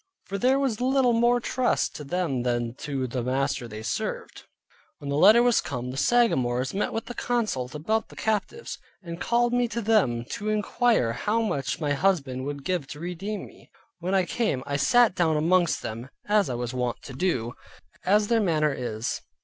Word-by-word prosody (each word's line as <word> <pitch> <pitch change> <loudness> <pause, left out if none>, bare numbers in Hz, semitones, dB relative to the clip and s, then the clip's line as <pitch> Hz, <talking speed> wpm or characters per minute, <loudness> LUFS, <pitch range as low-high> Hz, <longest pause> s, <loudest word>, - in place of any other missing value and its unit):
For 200 0 -4
there 260 +4 +3
was 260 -5 -1
little 260 -1 +3
more 240 +1 +3
trust 255 +1 0
to 150 - -7
them 150 -4 -1
than 120 -1 -1
to 135 -3 -3
the 125 0 -3
master 130 0 -1
they 110 -1 -8
served. - - -4 0.5
When 140 -1 -6
the - - 0
letter 210 +10 +7
was 245 -2 +4
come, 125 -2 -5
the - - -7
Sagamores 135 - +2
met 200 - -1
to 245 - -7
consult 215 - -2
about 215 +9 -1
the - - -14
captives, 220 - -2 0.2
and 170 -1 -7
called 240 0 +2
me 245 0 +2
to 230 +1 -4
them 195 - +2
to 210 +1 -3
inquire 215 - +1
how 220 - 0
much 140 - -2
my 150 -3 0
husband 140 -7 0
would 140 -1 -5
give 180 -7 -1
to 150 0 -9
redeem 180 +4 -4
me. - - -17 0.3
When 185 +3 -1
I 190 -1 +3
came 195 - -1
I 140 - -2
sat 235 +11 +4
down 165 -4 +2
among 175 +3 +3 0.2
them, 115 +4 -6 0.2
as 205 -4 +3
I 125 - -2
was 120 +1 -4
wont 125 -1 -2
to 135 - -9
do, 130 -7 -1 0.5
as 205 +2 +3
their 230 0 +3
manner 155 -6 +2
is. 115 -3 -3
175 Hz, 190 wpm, -26 LUFS, 130-220 Hz, 0.5 s, letter